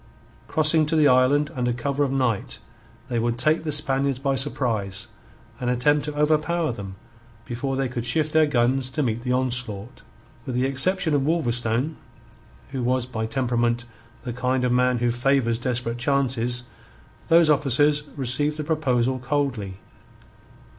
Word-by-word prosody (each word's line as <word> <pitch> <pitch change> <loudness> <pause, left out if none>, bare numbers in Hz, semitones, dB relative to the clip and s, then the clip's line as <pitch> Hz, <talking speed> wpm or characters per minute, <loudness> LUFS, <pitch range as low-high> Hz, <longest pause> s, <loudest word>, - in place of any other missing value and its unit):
Crossing 155 0 +2
to 160 - 0
the 155 -2 +5
island 140 +3 +3
under 125 -4 -1
cover 140 +4 -1
of 135 - -1
night, 125 -6 -1 0.5
they 120 -3 -1
would 120 +1 -1
take 155 +6 +2
the 155 - -3
Spaniards 140 -2 +1
by 135 +1 -1
surprise 110 -8 -1 0.5
and 125 - -2
attempt 145 +4 +2
to 150 -1 -5
overpower 155 +1 +1
them 100 -4 -7 0.5
before 135 +2 -3
they 135 0 0
could 120 -1 -4
shift 150 +6 0
their 155 -1 +5
guns 130 0 +1
to 150 +3 -1
meet 115 -2 -1
the 125 +1 -3
onslaught. 125 -4 -2 0.5
With 130 - -3
the 125 +1 +1
exception 160 +5 +1
of 145 - +2
Wolverstone, 130 -2 0 0.7
who 135 -2 -3
was 125 0 0
by 110 -3 -4
temperament 120 0 0 0.4
the 120 - -4
kind 125 +1 -1
of 125 - +1
man 125 0 +2
who 120 0 +1
favours 120 -1 +1
desperate 120 -1 -2
chances, 125 -2 0 0.6
those 165 -1 +5
officers 145 +1 +3 0.2
received 145 +3 -1
the 155 - -3
proposal 130 -5 0
coldly. 125 -8 -2
130 Hz, 155 wpm, -24 LUFS, 120-145 Hz, 0.7 s, the